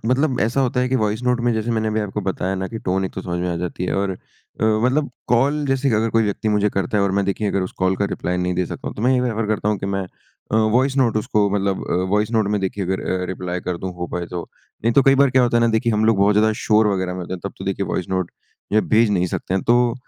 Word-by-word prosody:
मतलब 130 0 +1
ऐसा 115 +6 +1
होता 125 -1 +1
है 125 - +1
कि 130 - +1
वॉइस 110 0 -1
नोट 125 -1 +1
में 120 0 +1
जैसे 110 +2 -2
मैंने 110 -1 0
अभी 110 0 0
आपको 105 0 -3
बताया 95 -1 -2
ना 95 0 -3
कि 115 - -6
टोन 95 -1 -1
एक 95 - -4
तो 95 - -4
समझ 90 -1 -3
में 90 - -1
आ - - -3
जाती 90 +1 -4
है। - - -1
और 100 0 0
अ, 95 - -4 0.5
मतलब 125 +7 +2 0.2
कॉल 140 +5 +2
जैसे 135 0 +1
अगर 110 +1 +1
कोई 115 0 +3
व्यक्ति 105 +1 -2
मुझे 105 0 +2
करता 95 +2 -1
है 100 - +3
और 100 - +1
मैं 100 0 +1
देखिए 100 +2 -1
अगर 100 -1 0
उस 90 - -5
कॉल 95 0 +1
का 100 - 0
रिप्लाई 90 -2 -2
नहीं 90 0 -1
दे 90 0 0
सकता - - -6
हूँ, - - -7
तो 105 - -4
मैं 130 +2 +4
ये 125 - +2
प्रेफ़र 115 -3 -1
करता 105 -1 0
हूँ 105 -2 0
कि 95 - -4
मैं 100 0 -1 0.5
अ, - - +3
वॉइस 125 +5 +2
नोट 120 -5 +2
उसको 105 -1 +1
मतलब 100 -1 -1
अ, - - +1 0.2
वॉइस 105 +2 +1
नोट 110 -3 +1
में - - -2
देखिए 95 0 -2
अगर 95 +1 -1 0.2
अ, - - -1
रिप्लाई 90 -1 -4
कर 90 - -1
दूँ 95 0 -5
हो 90 - -3
पाए 90 -1 -3
तो। 90 -1 -5 0.4
नहीं 115 - +3
तो 140 - +5
कई 135 +1 +5
बार 140 -1 +4
क्या 130 0 +4
होता 120 -1 +2
है - - +3
ना 115 - +3
देखिए, 115 +1 +1
हम 105 +1 +1
लोग 110 -1 +4
बहुत 100 +1 +4
ज़्यादा 110 +1 +3
शोर 110 0 +4
वग़ैरह 95 -3 0
में 90 - -5
होते 90 - -6
हैं, 90 - -8
तब 100 - -4
तो 95 - -7
देखिए 100 0 -2
वॉइस 90 - -3
नोट 95 -2 -1 0.4
जो 110 - +5
है - - 0
भेज 110 0 +4
नहीं 90 -3 +1
सकते 90 - -3
हैं। 95 - 0
तो 120 0 +3
105 Hz, 305 wpm, -21 LUFS, 95-115 Hz, 0.5 s, तो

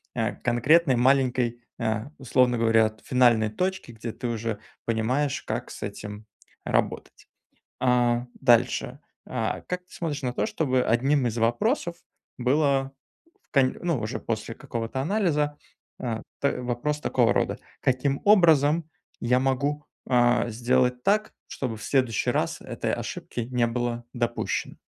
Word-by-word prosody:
э, 115 -1 -1
конкретной 135 +5 +3
маленькой, 125 -2 +2 0.2
э, 110 -1 -1
условно 125 -2 +2
говоря, 115 -1 +4
от, 110 -1 -12
финальной 120 -4 +4
точки, 185 - -2
где 115 0 -6
ты 120 - -5
уже 115 -2 -2 0.3
понимаешь, 125 +5 0
как - - -4
с - - -8
этим 105 +1 -7 0.4
работать. - - -2 0.5
А, 120 -1 +2
дальше, 125 +1 +2 0.3
а, 115 -3 -2
как 180 0 -5
ты - - -24
смотришь 150 -4 -3
на 125 -2 -1
то, - - 0
чтобы 130 -5 +1
одним 130 +3 +2
из 120 -1 -2
вопросов 170 - +1 0.4
было 135 +1 +2 0.6
в - - -73
конь 135 -2 +3
ну, 170 -7 0
уже 110 +4 -3
после 115 0 -3
какого-то 115 +3 -4
анализа, 150 -4 0 0.4
э, 115 -3 -3 0.2
т 140 -2 0
вопрос 125 +5 -2
такого - - +2
рода: - - 0 0.2
"Каким 135 +2 +1
образом 165 -5 +5 0.3
я 125 +2 +2
могу, 140 +3 0 0.2
а, 120 -1 +3
сделать 125 +2 +1
так, 210 +2 +2
чтобы 125 -5 -4
в 105 - -11
следующий 130 -6 +1
раз - - -1
этой - - -3
ошибки - - -5
не 125 -2 +2
было 120 0 -2
допущено?" 120 -1 -2
125 Hz, 140 wpm, -26 LUFS, 115-140 Hz, 0.6 s, образом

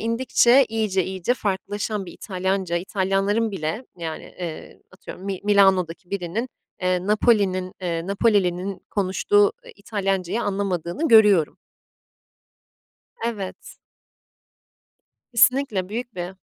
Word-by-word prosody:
indikçe 240 +3 +4
iyice 210 -5 0
iyice 190 +5 -1
farklılaşan 205 -1 -3
bir - - -9
İtalyanca, 190 -2 -2
İtalyanların 195 +4 0
bile, 195 +6 -4
yani, 165 -2 -6
eee, 170 -3 -7
atıyorum 190 0 -11
Mi 195 -2 -3
Milano'daki 190 -4 +3
birinin, 200 +6 -3 0.3
eee, 185 0 0
Napoli'nin 200 -4 +2
eee, 170 -1 -3
Napolili'nin 195 -2 +1
konuştuğu, 405 - +2
eee, 485 - -12
İtalyancayı 195 0 -2
anlamadığını 195 - -2
görüyorum. 210 -8 +5 1.7
Evet. 205 -5 -5 1.5
Kesinlikle, 235 -5 +3
büyük 240 +2 -5
bir 180 +1 -5
195 Hz, 100 wpm, -23 LUFS, 185-220 Hz, 1.7 s, görüyorum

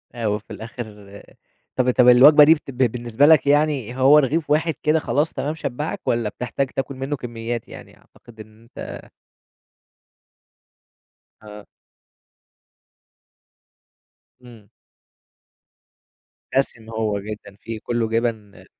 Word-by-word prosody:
أ 115 -2 -3
وفي 105 0 -4
الآخر 105 -3 -10 0.5
طب 130 -1 +2
طب 125 0 +3
الوجبة 145 +5 +8
دي 155 +2 +7
بت 150 -3 -8
ب 125 - -15
بالنسبة 120 +3 0
لك 155 -2 +5
يعني 145 -5 +1
هو 135 +3 +6
رغيف 150 +2 +1
واحد 155 +2 +1
كده 155 +1 +2
خلاص 150 +3 -1
تمام 150 +3 -3
شبّعك؟ 150 +6 -5
والّا 115 -2 0
بتحتاج 125 +5 -3
تاكل 135 +1 -5
منه 135 +3 -4
كميات 120 -2 -6
يعني؟ - - -13
أعتقد 115 -2 -21
إن 110 +1 -14
أنت 115 - -10 2.3
آه. 105 -1 -12 2.8
إمم. 115 -5 -16 1.9
دسم 120 -4 -1
هو 110 -2 -2
جدًا 105 -1 -9
فيه 115 -1 -5
كله 120 -2 -2
جبن 115 -3 -3
120 Hz, 115 wpm, -21 LUFS, 110-145 Hz, 2.8 s, الوجبة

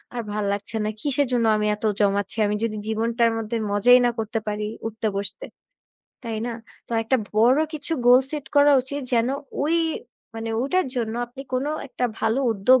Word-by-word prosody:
আর 240 - -1
ভাল 210 0 -2
লাগছে 205 +2 -3
না, - - 0
কিসের 285 0 +1
জন্য 235 -2 +2
আমি 210 0 0
এত 210 - -6 0.2
জমাচ্ছি, 200 +1 +1
আমি 210 - 0
যদি 220 -2 -1
জীবনটার 230 +1 +1
মধ্যে 225 +1 -2
মজাই 245 +5 +6
না 240 - +3
করতে 225 +1 -2
পারি 210 0 -2 0.2
উঠতে 220 0 -3
বসতে, 200 - -5 0.8
তাই 225 -1 -3
না? 240 - -3 0.4
তো - - -6
একটা 225 +4 +2 0.2
বড় 245 +5 +5 0.2
কিছু 310 +2 -4
গোল 250 +1 +8
সেট 295 -3 -5
করা 285 0 +7
উচিত 280 +3 -5
যেন 235 +1 +2 0.4
ওই 320 +3 +1 0.6
মানে 225 0 -4
ওটার 365 +4 +1
জন্য 225 -2 -1
আপনি 245 +3 -10
কোন 255 +2 0 0.2
একটা 250 - -3 0.2
ভালো 225 +4 +1
উদ্যোগ 240 +5 +4
230 Hz, 185 wpm, -24 LUFS, 215-255 Hz, 0.8 s, গোল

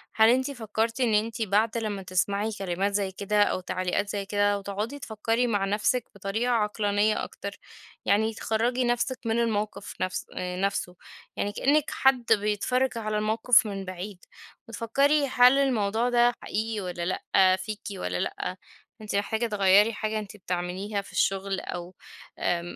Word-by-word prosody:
هل 220 0 +6
أنتِ 260 +3 +2
فكرتِ 230 0 -2
إن 235 -3 +2
أنتِ 225 +3 -1
بعد 220 +2 +1
لما 210 -3 -3
تسمعي 200 +4 0
كلمات 195 +2 -1
زي 195 -2 0
كده 205 +2 +2
أو 185 - 0
تعليقات 185 +3 -1
زي 200 0 -3
كده 205 0 +1
وتقعدي 210 +8 -4
تفكري 225 +1 -1
مع 205 -3 +1
نفسِك 215 +4 +1
بطريقة 200 +5 -1
عقلانية 210 -1 +1
أكتر، - - -7 0.5
يعني 220 +2 +2
تخرّجي 235 +4 0
نفسِك 240 +2 0
من 225 +1 +1
الموقف 215 -3 -2
نفس 185 0 -2
آآ، 180 0 -3
نفسه 195 -2 -1 0.4
يعني 205 - -1
كإنِك 290 +7 +2
حد 265 -3 +3
بيتفرج 225 +5 0
على 215 -1 -2
الموقف 220 +3 +4
من 195 -2 -5
بعيد 185 +1 -7 0.4
وتفكري 275 +6 +2
هل 250 +1 +6
الموضوع 230 -3 +1
ده 240 0 +4
حقيقي 220 0 -2
والّا 175 -2 -4
لأ؟ 185 +1 +3
فيكِ 210 +2 -6
والّا 90 - -3
لأ؟ 185 - -3 0.4
أنتِ 210 -1 -4
محتاجة 220 +3 0
تغيّري 205 +1 +4
حاجة 215 0 -2
أنتِ 210 0 -9
بتعمليها 185 +3 -3
في 200 - -15
الشغل 195 0 0
أو 175 +1 -7 0.4
آآ، 170 -1 +1
210 Hz, 155 wpm, -27 LUFS, 195-230 Hz, 0.5 s, هل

